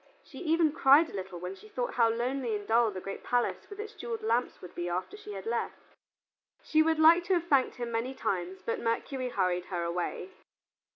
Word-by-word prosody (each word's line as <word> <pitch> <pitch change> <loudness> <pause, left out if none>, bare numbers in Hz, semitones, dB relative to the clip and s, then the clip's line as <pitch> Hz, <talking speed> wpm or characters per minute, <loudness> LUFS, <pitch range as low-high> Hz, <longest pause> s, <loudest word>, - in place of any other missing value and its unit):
She - - -12
even 325 -2 +2
cried 305 0 +5
a - - -8
little 190 -2 -6
when 180 +2 -5
she 195 +3 -15
thought 245 +2 -3
how 230 -2 +4
lonely 240 0 -1
and 205 -1 -6
dull 230 0 +4
the 190 -3 -6
great 195 +1 -7
palace 245 -1 -1
with 405 0 -10
its 430 +1 -6
jeweled 235 - -5
lamps 230 +3 0
would 180 - -11
be 175 0 -3
after 180 - -3
she 315 - -9
had 195 -1 -7
left. 235 +1 -4 0.7
She 315 - +3
would 320 0 +2
like 330 +3 +6
to 370 +1 +2
have 340 -1 -1
thanked 275 -6 +2
him 240 -1 -4
many 235 +4 -2
times, 185 -2 -3
but 230 - -1
Mercury 250 +3 -2
hurried 180 -5 0
her 175 -2 -3
away. 175 - -3
235 Hz, 215 wpm, -30 LUFS, 190-305 Hz, 0.7 s, like